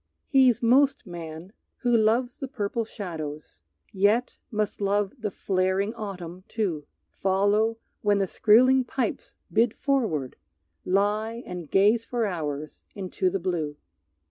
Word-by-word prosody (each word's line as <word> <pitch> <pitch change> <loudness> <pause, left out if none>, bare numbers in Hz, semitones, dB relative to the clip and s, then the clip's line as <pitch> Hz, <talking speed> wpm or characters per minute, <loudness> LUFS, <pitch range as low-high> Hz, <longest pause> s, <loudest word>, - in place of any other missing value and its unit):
He's 255 -4 +4
most 270 +4 +4
man 170 +1 -8 0.3
who 240 -1 +3
loves 230 +3 +2
the 270 - -4
purple 230 -2 -2
shadows, 155 - -7 0.3
Yet 210 +6 +2
must 210 -2 -2
love 200 0 +1
the 215 -2 -2
flaring 190 +2 0
autumn 185 -5 -7
too, 180 -10 -2 0.2
Follow 205 +4 +1 0.2
when 205 -1 +3
the 195 - +2
skrieling 255 +7 +5
pipes 245 -1 -3 0.2
bid 230 +1 +3
forward, 220 - -1 0.5
Lie 210 +5 0
and 175 -4 -7
gaze 210 +4 +4
for 235 -1 -1
hours 155 -6 -4
into 185 -1 -1
the 195 +2 -2
blue. 165 -5 -2
205 Hz, 125 wpm, -26 LUFS, 180-230 Hz, 0.5 s, skrieling